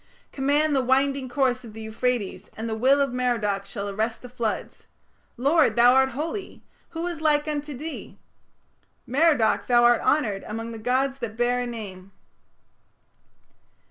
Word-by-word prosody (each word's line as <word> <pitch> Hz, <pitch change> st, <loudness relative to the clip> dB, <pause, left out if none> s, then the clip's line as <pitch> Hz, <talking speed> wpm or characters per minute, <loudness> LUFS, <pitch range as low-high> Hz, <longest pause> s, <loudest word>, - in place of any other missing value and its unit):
Command 290 Hz, +2 st, +1 dB
the 265 Hz, -, +2 dB
winding 265 Hz, +1 st, +1 dB
course 255 Hz, -1 st, 0 dB
Of 225 Hz, -3 st, -11 dB
the 220 Hz, -, -9 dB
Euphrates, 220 Hz, -3 st, -2 dB
And 225 Hz, +1 st, -4 dB
the 225 Hz, -, -2 dB
will 265 Hz, +5 st, +3 dB
of 275 Hz, -3 st, 0 dB
Merodach 220 Hz, -6 st, -1 dB
Shall 200 Hz, 0 st, -5 dB
arrest 220 Hz, +4 st, -2 dB
the 250 Hz, -, -9 dB
floods. 235 Hz, -3 st, -4 dB, 0.5 s
Lord, 290 Hz, +6 st, +3 dB
thou 240 Hz, +1 st, +6 dB
art 265 Hz, 0 st, +4 dB
holy! 320 Hz, -, -5 dB, 0.3 s
Who 330 Hz, +1 st, -4 dB
is 345 Hz, -3 st, -4 dB
like 300 Hz, -1 st, +2 dB
unto 295 Hz, -2 st, -4 dB
thee? 310 Hz, +3 st, -7 dB, 0.9 s
Merodach 280 Hz, -3 st, +2 dB
thou 240 Hz, -1 st, +4 dB
art 240 Hz, -1 st, +5 dB
honoured 215 Hz, -10 st, +1 dB
Among 225 Hz, +2 st, -5 dB
the 225 Hz, -, -7 dB
gods 265 Hz, +4 st, 0 dB
that 225 Hz, -3 st, -5 dB
bear 245 Hz, +1 st, +1 dB
a 245 Hz, -, -2 dB
name. 195 Hz, -5 st, -8 dB
250 Hz, 155 wpm, -25 LUFS, 225-280 Hz, 0.9 s, thou